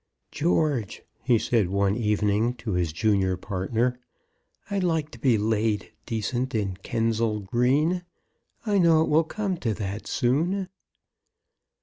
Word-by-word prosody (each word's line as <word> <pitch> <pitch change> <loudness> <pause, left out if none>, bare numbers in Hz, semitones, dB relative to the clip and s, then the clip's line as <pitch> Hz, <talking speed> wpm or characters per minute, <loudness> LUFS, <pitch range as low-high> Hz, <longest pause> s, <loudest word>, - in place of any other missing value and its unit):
"George," 150 - 0 0.2
he 125 -3 +3
said 110 -4 +1
one 100 +1 +1
evening 105 +1 +1
to 115 -2 -5
his 90 -3 0
junior 95 +1 +1
partner, 110 +7 -1 0.7
"I'd 200 -2 -1
like 160 -4 0
to - - -12
be 125 -5 +3
laid 105 -1 0 0.2
decent 120 +3 -2
in 100 -4 -1
Kensal 115 +1 -1
Green! 135 - +1 0.6
I 205 -2 +2
know 165 -3 +5
it - - -2
will 155 +2 +4
come 195 +2 -3
to 115 -8 -2
that 100 0 -5
soon." 170 +10 0
115 Hz, 130 wpm, -26 LUFS, 105-150 Hz, 0.7 s, know